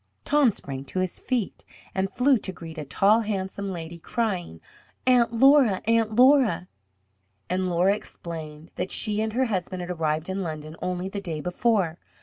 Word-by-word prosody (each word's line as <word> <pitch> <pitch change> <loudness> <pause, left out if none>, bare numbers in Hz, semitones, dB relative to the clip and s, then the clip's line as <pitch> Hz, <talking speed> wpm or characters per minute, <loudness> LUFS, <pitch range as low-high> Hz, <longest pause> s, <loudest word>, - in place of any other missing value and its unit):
Tom 290 -3 +4
sprang 135 -9 -6
to 165 - -7
his 185 -1 -1
feet, 245 -6 -2 0.3
and 190 0 0
flew 260 +2 +3
to 190 - -5
greet 165 -3 -9
a 150 - -5
tall, 200 +10 +3
handsome 200 -2 -3
lady, 170 -1 -7
crying, 180 - -2 0.5
"Aunt 245 -2 +4
Laura! 255 -4 +5
Aunt 225 -1 +2
Laura!" 255 -6 +5 0.8
And 185 0 0
Laura 180 +3 +3
explained 160 -5 -9
that 185 - -2
she 210 -1 +2
and 220 0 -2
her 260 +2 +2
husband 185 -4 -3
had 175 - -5
arrived 160 -2 -1
in 190 +1 -3
London 155 -2 -6
only 180 0 -2
the 200 +1 -5
day 165 -5 -4
before. 180 0 0
190 Hz, 165 wpm, -25 LUFS, 170-225 Hz, 0.8 s, Laura